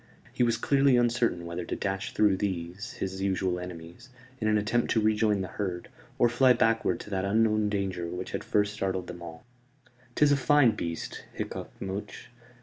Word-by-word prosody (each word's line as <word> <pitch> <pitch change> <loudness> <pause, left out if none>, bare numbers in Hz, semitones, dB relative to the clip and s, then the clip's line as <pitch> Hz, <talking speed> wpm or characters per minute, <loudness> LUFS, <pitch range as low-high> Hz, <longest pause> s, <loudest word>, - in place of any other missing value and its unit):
He - - -2
was 120 -1 +3
clearly 135 +1 +3
uncertain 120 -7 +1
whether 85 +1 -4
to - - -4
dash 95 -1 -3
through 105 -3 +4
these 95 0 -4
his 95 0 -4
usual 95 -2 0
enemies, 90 +5 -9 0.3
in 110 - -1
an 110 0 +3
attempt 105 +3 0
to 115 - +3
rejoin 105 -1 +2
the 95 - -3
herd, 90 -4 -4 0.3
or 120 - +5
fly 125 +2 +5
backward 115 -6 +1
to 105 - -11
that 95 -1 -1
unknown 110 +1 +2
danger 95 -4 -2
which 90 +2 -5
had - - -3
first 105 0 +1
startled 95 -3 -2
them 90 -1 -9
all. 80 -1 -10 0.7
"'Tis 150 -1 +4
a 145 - +4
fine 140 -3 +5
beast," 85 -5 -5
hiccoughed - - -5
Much. 95 +1 -6
100 Hz, 180 wpm, -28 LUFS, 90-115 Hz, 0.7 s, or